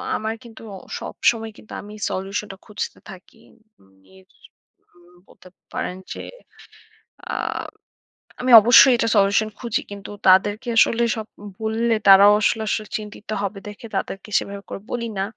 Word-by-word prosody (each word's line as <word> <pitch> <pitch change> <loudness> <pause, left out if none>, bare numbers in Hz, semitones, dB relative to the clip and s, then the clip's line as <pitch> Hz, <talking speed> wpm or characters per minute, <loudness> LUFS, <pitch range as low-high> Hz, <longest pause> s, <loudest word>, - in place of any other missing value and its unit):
আমার 220 +1 -3
কিন্তু 225 -2 -14
অ - - -8 0.2
সবসময় 225 -1 -1
কিন্তু 220 - -14
আমি 210 0 -12 0.2
সলিউশানটা 195 +1 -4
খুঁজতে 210 - -6
থাকি। 190 +4 -14 0.4
উম 95 0 -26 0.2
ইর 95 0 -20 0.7
উম 175 0 -23
বলতে - - -19 0.3
পারেন 180 - -4 0.2
যে - - -8 1.1
আম - - -3 0.7
আমি 255 0 0
অবশ্যই 245 +3 +7
এটা 230 - 0
সলিউশান 200 +2 +3
খুঁজি। 235 -3 -2
কিন্তু 200 -1 -9 0.2
তাদেরকে 205 +5 +4
আসলে 235 +1 +4
সব 220 -1 -6 0.2
উ - - -9 0.2
বললে, 225 +1 0
তারাও 200 +1 +8
আসলে 220 +1 +1
আসলে 215 -1 -2
চিন্তিত 210 0 -11 0.2
হবে 195 0 -4
দেখে 210 +3 -9
তাদেরকে 195 +2 -5
সেভাবে 200 0 -8
করে 195 - -7
বলি 235 -1 -3
না। 195 - +1
210 Hz, 150 wpm, -21 LUFS, 195-225 Hz, 1.1 s, তারাও